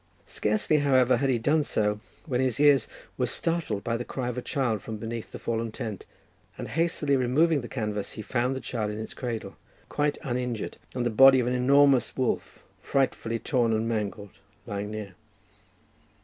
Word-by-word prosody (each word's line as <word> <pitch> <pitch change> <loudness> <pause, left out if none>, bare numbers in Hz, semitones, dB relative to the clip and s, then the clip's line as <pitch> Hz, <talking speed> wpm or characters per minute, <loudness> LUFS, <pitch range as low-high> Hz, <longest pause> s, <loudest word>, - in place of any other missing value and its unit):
Scarcely, 110 +8 +1
however, 130 -3 +4
had 135 +2 0
he 125 - +3
done 145 +7 +2
so, 105 -7 0 0.3
when 130 -5 0
his 130 -2 0
ears 145 -4 +5 0.3
were - - +2
startled 165 -12 -2
by 115 0 -1
the 120 - -4
cry 125 0 -4
of 125 - -4
a - - -5
child 120 -6 -1
from 110 +2 -6
beneath 115 +1 -6
the - - -6
fallen 115 -1 -2
tent, 110 -2 -6 0.5
and - - -6
hastily 160 -3 +1
removing 140 +5 +3
the 120 - -7
canvas, 105 -5 -3
he 110 - -7
found 125 +3 0
the 130 - -5
child 110 -4 -3
in 105 - -5
its 110 - -6
cradle 115 -6 -5 0.3
quite 145 0 0
uninjured, 125 -5 -3 0.2
and 125 -1 -1
the 120 - +1
body 135 +3 +7
of 125 - +1
an 125 - 0
enormous 135 +1 +4
wolf, 130 -2 -2 0.2
frightfully 125 -4 0
torn 120 -2 +1
and 110 +1 0
mangled, 105 -3 -3 0.3
lying 100 -1 -4
near. 105 -3 -6
120 Hz, 180 wpm, -27 LUFS, 110-135 Hz, 0.5 s, body